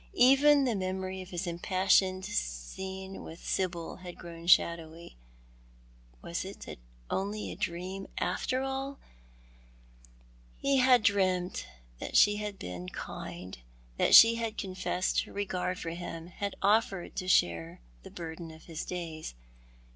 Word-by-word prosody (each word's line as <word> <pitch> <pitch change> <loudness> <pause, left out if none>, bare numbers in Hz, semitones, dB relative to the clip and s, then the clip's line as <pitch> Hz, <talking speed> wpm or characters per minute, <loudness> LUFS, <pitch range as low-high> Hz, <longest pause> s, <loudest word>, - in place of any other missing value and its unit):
Even 280 +2 +6
the 245 - +1
memory 190 -1 -3
of 185 - -10
his 175 0 -3
impassioned 185 +2 +2
scene 190 - -4
with 165 - -10
Sibyl 175 -3 -2
had 180 -1 -9
grown 170 -1 -10
shadowy. 170 - +2 1.1
Was - - -3
it - - -8 0.3
only 205 +2 -2
a - - -6
dream, 185 +3 -4
after 255 +8 0
all? 270 +1 -3 1.6
He 275 0 +2
had 250 -3 +5
dreamt 185 -3 +1 0.3
that - - -1
she 205 0 +6
had 210 -1 -4
been 90 - -6
kind, 90 -3 -7 0.4
that - - +5
she 230 0 +10
had 225 -2 -3
confessed 185 -1 -1
her - - -13
regard 185 -2 -2
for 165 - -4
him, 170 -1 -6
had 200 +2 -4
offered 200 -3 +2
to 185 - -3
share 85 - +2 0.2
the - - -11
burden 165 0 -7
of 160 0 -13
his 165 -2 -6
days. 165 - -6
185 Hz, 130 wpm, -30 LUFS, 170-205 Hz, 1.6 s, she